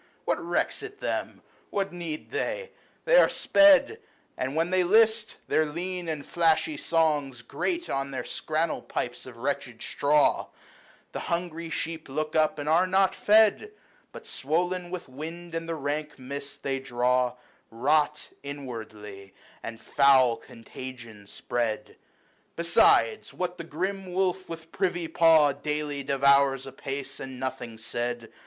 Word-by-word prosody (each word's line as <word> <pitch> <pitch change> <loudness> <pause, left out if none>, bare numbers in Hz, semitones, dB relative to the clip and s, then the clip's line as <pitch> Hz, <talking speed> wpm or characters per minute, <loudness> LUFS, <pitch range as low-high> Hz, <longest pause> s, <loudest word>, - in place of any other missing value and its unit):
What - - 0
recks - - 0
it 425 -1 -9
them? - - -3 0.3
What 195 -2 -2
need 165 -3 -6
they? 480 +2 -3 0.3
They - - +5
are - - +7
sped; 300 +9 +5 0.4
And, 130 +3 -3
when 165 +2 +1
they 185 -1 +3
list, 220 +3 +3
their 155 - +3
lean 175 +3 -4
and 150 -3 -4
flashy 170 - +2
songs 150 - 0
Grate 340 - -2
on 135 0 -2
their 135 - -4
scrannel 155 +1 -2
pipes 120 +1 -4
of 125 -2 -11
wretched 130 -2 -3
straw; 145 +1 +2 0.6
The - - -4
hungry 170 -1 -3
sheep 160 0 -4
look 155 +3 -3
up, 155 -1 +3
and 145 0 -5
are 170 +4 +4
not 190 0 +3
fed, 220 - +4 0.4
But, - - -11
swoln 175 +5 -1
with 180 -3 -6
wind 165 +6 -8
and 165 0 -4
the 165 - -1
rank 150 +1 -3
mist 140 +2 -7
they 135 -1 -1
draw, 125 -1 +1 0.4
Hot 150 +6 +1
inwardly, 110 -8 -8 0.3
and 115 -1 -7
foul 130 -2 +4
contagion 115 -2 -11
spread; 120 -1 -3 0.6
Besides 170 - +3
what 180 0 -3
the - - -4
grim 185 +4 -4
wolf 185 0 0
with 165 0 -8
privy 175 -3 -1
paw 160 -2 +5
Daily 150 0 -3
devours 140 0 +3
apace, 135 +1 -6
and 130 -1 -7
nothing 125 -3 -5
said. 120 +1 -4
155 Hz, 140 wpm, -27 LUFS, 130-175 Hz, 0.6 s, are